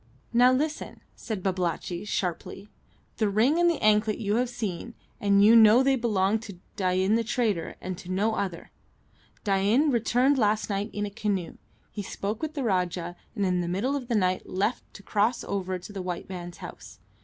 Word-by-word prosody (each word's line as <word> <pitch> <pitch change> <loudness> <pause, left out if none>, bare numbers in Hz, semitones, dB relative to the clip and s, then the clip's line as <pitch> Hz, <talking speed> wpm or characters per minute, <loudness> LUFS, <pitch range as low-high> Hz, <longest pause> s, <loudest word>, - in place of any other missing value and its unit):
"Now, 245 +2 +6
listen," 300 +4 -2
said 215 -6 -5
Babalatchi, 180 -1 -2
sharply. 195 0 -3 0.5
"The 215 -2 +1
ring 240 +11 +3
and 345 0 +5
the 335 - 0
anklet 215 0 +3
you 210 0 0
have 250 0 +1
seen, 225 0 -5 0.2
and 200 0 +4
you 225 +2 +7
know 225 +3 +7
they 270 0 +3
belonged 215 -3 +1
to 200 -5 -9 0.2
Dain 185 +1 +1
the 230 +1 +2
trader, 220 -6 -1
and 185 0 -5
to 180 - -11
no 205 +4 +1
other. 185 -5 -4 0.7
Dain 210 +9 +2
returned 250 +3 +2
last 215 -1 +1
night 200 +2 -2
in 205 0 -3
a 205 - -6
canoe. 200 -4 -2 0.3
He 210 - -5
spoke 205 +2 -4
with 315 0 -4
the 280 - -2
Rajah, 180 -4 -1 0.2
and 200 -3 0
in 180 -1 +1
the 175 - -3
middle 205 +11 -1
of 260 -4 -4
the 240 - 0
night 185 -3 0
left 200 +6 -2
to 200 - -11
cross 215 +5 +1
over 190 -2 -3
to 180 +3 -11
the 195 - -4
white 180 -1 -5
man's 175 -2 -7
house. 175 - -10
205 Hz, 190 wpm, -27 LUFS, 185-230 Hz, 0.7 s, you